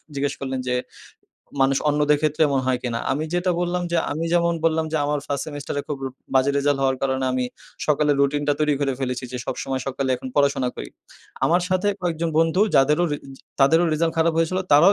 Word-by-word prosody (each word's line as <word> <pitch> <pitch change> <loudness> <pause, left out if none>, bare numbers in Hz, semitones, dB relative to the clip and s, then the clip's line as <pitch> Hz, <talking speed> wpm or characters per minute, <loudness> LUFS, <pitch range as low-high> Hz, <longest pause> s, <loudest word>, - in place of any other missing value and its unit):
জিজ্ঞেস 140 0 -1
করলেন 130 -1 -3
যে, 125 - +1 0.9
মানুষ 135 0 +3
অন্যদের 150 0 +3
ক্ষেত্রে 155 +1 +1
এমন 135 -2 +1
হয় 130 -1 +1
কিনা? 120 -2 -2
আমি 150 +3 -1
যেটা 175 +1 +1
বললাম 175 0 -1
যে, 170 - +2 0.2
আমি 160 +3 -3
যেমন 170 0 +2
বললাম 160 0 +2
যে, 160 - +1
আমার 145 0 0
ফার্স্ট 140 -1 -2
সেমেস্টার 145 -2 -5
এ - - -9
খুব 145 - -3 0.4
বাজে 130 +1 +4
রেজাল্ট 145 0 +1
হওয়ার 130 -1 +2
কারণে 130 -1 0
আমি 125 0 0 0.4
সকালে 150 0 +3
রুটিনটা 145 +1 +2
তৈরি 150 -1 +3
করে 135 -1 +1
ফেলেছি 125 -1 -2
যে, 125 - -3
সবসময় 135 -1 -3
সকালে 135 0 -2
এখন 130 - -7
পড়াশোনা 140 -3 +2
করি। - - -6 0.6
আমার 175 +2 +3
সাথে 185 +2 +1
কয়েকজন 165 -1 -1
বন্ধু 165 +4 +2 0.2
যাদেরও 150 +5 +4
রি 145 - 0 0.4
তাদেরও 160 +5 +5
রেজাল্ট 165 +1 +1
খারাপ 165 +1 +3
হয়েছিল, 165 +3 +1
তারাও 170 +7 +7
145 Hz, 195 wpm, -23 LUFS, 135-165 Hz, 0.9 s, তারাও